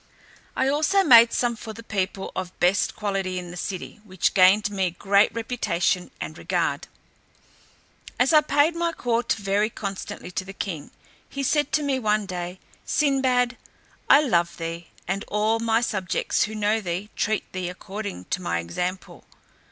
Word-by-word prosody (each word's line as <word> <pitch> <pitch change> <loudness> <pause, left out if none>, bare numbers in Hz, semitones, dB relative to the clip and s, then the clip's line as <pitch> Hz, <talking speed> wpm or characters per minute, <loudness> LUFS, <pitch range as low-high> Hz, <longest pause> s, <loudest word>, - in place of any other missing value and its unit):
I 265 - +1
also 310 +8 +3
made 235 -7 +8
some 240 -1 0
for 220 0 -8
the 230 - -11
people 195 -2 -3
of 185 -1 -5
best 180 +3 +2
quality 195 -3 -2
in 175 -1 -6
the - - -9
city, 185 +3 -6
which 185 -4 0
gained 200 +2 +5
me 190 -2 0
great 200 +1 +4
reputation 220 -6 -1
and - - -6
regard. - - -1 1.3
As 255 +5 +3
I 305 - +8
paid 295 +2 +2
my 335 0 0
court 235 -3 0
very 205 +1 0
constantly 195 -4 -6
to 185 - -3
the 195 +1 -9
king, 160 -7 -4 0.4
he 275 - -4
said 295 +2 +1
to 305 - +2
me 275 -2 0
one 215 -2 +1
day, 180 -1 -5 0.2
"Sinbad, 260 -4 +1 0.5
I 285 - +8
love 175 - +1
thee; 165 0 -5 0.2
and 195 +3 -2
all 215 +2 +1
my 225 0 +2
subjects 190 -6 0
who 220 - -7
know 215 +1 +1
thee, 185 +2 -4
treat 215 0 -1
thee 185 -1 -3
according 195 - -7
to - - -1
my 85 -1 -1
example. 180 - -4
205 Hz, 160 wpm, -24 LUFS, 185-240 Hz, 1.3 s, made